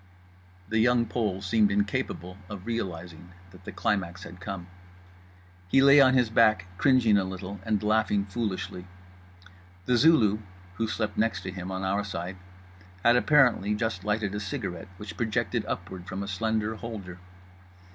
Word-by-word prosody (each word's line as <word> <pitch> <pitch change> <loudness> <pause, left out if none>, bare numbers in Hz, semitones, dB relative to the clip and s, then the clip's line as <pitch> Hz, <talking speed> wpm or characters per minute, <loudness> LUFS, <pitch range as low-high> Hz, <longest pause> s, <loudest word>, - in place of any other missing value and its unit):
The 110 +2 0
Young 120 +1 +4
Pole 105 -4 -2
seemed 105 +2 +3
incapable 100 -3 -2
of 100 -2 -8
realising 90 -6 -5 0.2
that 90 0 -16
the - - -6
climax 95 -3 -2
had 90 +2 -10
come. 95 -1 -6 1.0
He 135 - +4
lay 140 +1 +8
on 130 -1 +5
his 125 -4 +2
back, 110 -4 +4
cringing 120 -7 +4
a - - 0
little 95 +1 -6
and 105 0 0
laughing 105 -2 +2
foolishly. 100 -4 -4 1.0
The 125 - +3
Zulu 115 -8 +5 0.4
(who 115 - 0
slept 110 -2 -2
next 105 -3 +1
to 95 - -5
him 90 0 -6
on 95 0 -4
our 100 +2 0
side) 95 -1 -5 0.7
had, 120 +1 +6
apparently, 125 -7 +4
just 105 -4 -2
lighted 105 -1 -1
a 105 - -2
cigarette 90 -4 -5
which 105 +2 -8
projected 110 -3 -1
upward 90 -1 -5
from 100 -1 -4
a - - -6
slender 110 +2 -1
holder. 100 -6 -7
105 Hz, 155 wpm, -27 LUFS, 95-115 Hz, 1.0 s, lay